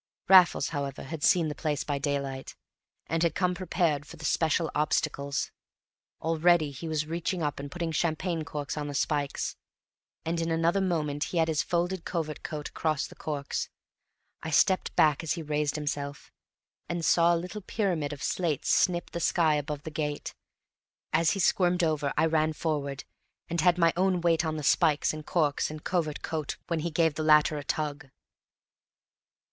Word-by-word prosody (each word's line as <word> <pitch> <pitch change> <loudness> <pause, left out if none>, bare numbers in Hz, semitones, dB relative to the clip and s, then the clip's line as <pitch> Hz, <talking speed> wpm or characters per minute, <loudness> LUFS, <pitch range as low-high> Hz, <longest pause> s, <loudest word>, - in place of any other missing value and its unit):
Raffles, 185 -2 +6
however, 140 -3 -4
had 150 +2 -6
seen 170 -3 +4
the 150 - -3
place 150 -2 -2
by 145 -1 -2
daylight, 140 -2 -3 0.5
and 165 0 -1
had 170 -2 +2
come 180 -1 +1
prepared 170 -5 0
for 170 - -11
the 160 - -8
special 160 +1 +1
obstacles; 140 -1 -1 0.7
already 165 -1 +3
he 140 +5 -7
was 155 -1 -1
reaching 170 +2 -2
up 145 -1 -2
and 140 0 -6
putting 170 +2 -3
champagne 165 +1 -1
corks 150 -3 -5
on 150 -1 -3
the 145 - -5
spikes, 145 -1 -1 0.7
and 165 +1 -1
in 165 - -1
another 165 +4 +2
moment 155 -6 0
he 175 - -4
had 160 -1 +3
his 155 -1 +1
folded 175 +2 -1
covert 160 -3 -3
coat 150 -2 -5
across 155 -3 -1
the - - -11
corks. 145 -2 -4 0.7
I 160 - -5
stepped 185 +4 +2
back 150 -2 +4
as 160 - 0
he 165 - -5
raised 150 -1 -1
himself, 145 -1 -4 0.6
and 170 -1 -2
saw 170 0 +5
a - - +1
little 180 +5 -6
pyramid 180 -8 -1
of 145 -1 -7
slates 165 -6 0
snip 175 -2 +2
the 170 - -4
sky 165 -1 +3
above 145 0 -3
the 160 - -6
gate; 150 -1 -3 0.8
as 160 +1 +3
he 200 - -3
squirmed 180 -1 +3
over 150 -3 +1
I 160 - +4
ran 155 -1 +2
forward, 145 -4 -2 0.5
and 170 -1 0
had 180 0 +4
my 165 -1 +4
own 185 0 +2
weight 165 -1 +3
on 155 0 -2
the 150 - -5
spikes 150 +2 +3
and 155 0 -7
corks 150 -4 +1
and 155 0 -8
covert 160 -5 -1
coat 155 -3 -3
when 170 -2 -1
he 170 +2 -2
gave 165 -1 +2
the 155 - -4
latter 150 -1 +5
a - - -7
tug. 145 -1 -3
155 Hz, 180 wpm, -28 LUFS, 150-170 Hz, 0.8 s, Raffles